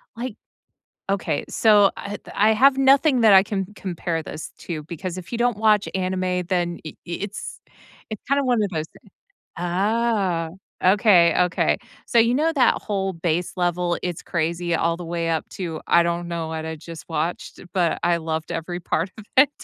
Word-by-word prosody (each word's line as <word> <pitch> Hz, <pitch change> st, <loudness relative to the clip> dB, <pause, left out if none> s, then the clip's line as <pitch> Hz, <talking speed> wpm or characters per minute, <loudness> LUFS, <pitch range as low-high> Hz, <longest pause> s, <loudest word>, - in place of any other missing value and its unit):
like 240 Hz, -2 st, -5 dB, 0.8 s
okay, 170 Hz, -7 st, -1 dB
so, 210 Hz, -3 st, +5 dB
eh, 205 Hz, 0 st, -5 dB, 0.2 s
I 215 Hz, +2 st, +4 dB
have 265 Hz, +4 st, +4 dB
nothing 270 Hz, 0 st, +4 dB
that 220 Hz, -2 st, +7 dB
I 190 Hz, 0 st, +8 dB
can 195 Hz, -2 st, -3 dB
compare 170 Hz, -4 st, -3 dB
this 155 Hz, -, -8 dB
to 155 Hz, -4 st, -6 dB
because 180 Hz, +2 st, -6 dB
if 175 Hz, +5 st, -10 dB
you 235 Hz, -, -2 dB
don't 240 Hz, -3 st, +1 dB
watch 215 Hz, -2 st, +3 dB
anime, 185 Hz, -1 st, -1 dB
then 175 Hz, -2 st, 0 dB
i 155 Hz, -, -7 dB
it's 195 Hz, +4 st, -6 dB, 0.5 s
it's 215 Hz, -, -6 dB
kinda 280 Hz, 0 st, +2 dB
one 245 Hz, -4 st, +2 dB
of 200 Hz, -, -3 dB
those 160 Hz, -2 st, -3 dB
thing -, -, -22 dB, 0.5 s
ah, 195 Hz, -1 st, 0 dB, 0.4 s
okay, 185 Hz, -4 st, +5 dB
okay. 180 Hz, -, +1 dB, 0.3 s
So, 235 Hz, -, 0 dB
you 230 Hz, +2 st, +4 dB
know 315 Hz, +4 st, +2 dB
that 270 Hz, -5 st, +4 dB
whole 195 Hz, -2 st, -2 dB
base 170 Hz, +1 st, -1 dB
level, 175 Hz, -1 st, 0 dB
it's 175 Hz, -2 st, -4 dB
crazy 170 Hz, 0 st, -1 dB
all 170 Hz, 0 st, +1 dB
the 175 Hz, -, -7 dB
way 165 Hz, 0 st, -2 dB
up 160 Hz, -, -2 dB
to, 165 Hz, -4 st, -5 dB
"I 170 Hz, -, +5 dB
don't 170 Hz, 0 st, -2 dB
know 170 Hz, -1 st, -3 dB
what 160 Hz, 0 st, -4 dB
I 160 Hz, -, -4 dB
just 165 Hz, +1 st, -10 dB
watched, 165 Hz, +2 st, -3 dB
but 175 Hz, -3 st, +1 dB
I 175 Hz, 0 st, +3 dB
loved 160 Hz, 0 st, -4 dB
every 175 Hz, +2 st, -4 dB
part 170 Hz, +1 st, -1 dB
of 220 Hz, -, -10 dB
it." 275 Hz, +1 st, +7 dB
180 Hz, 180 wpm, -23 LUFS, 170-210 Hz, 0.8 s, I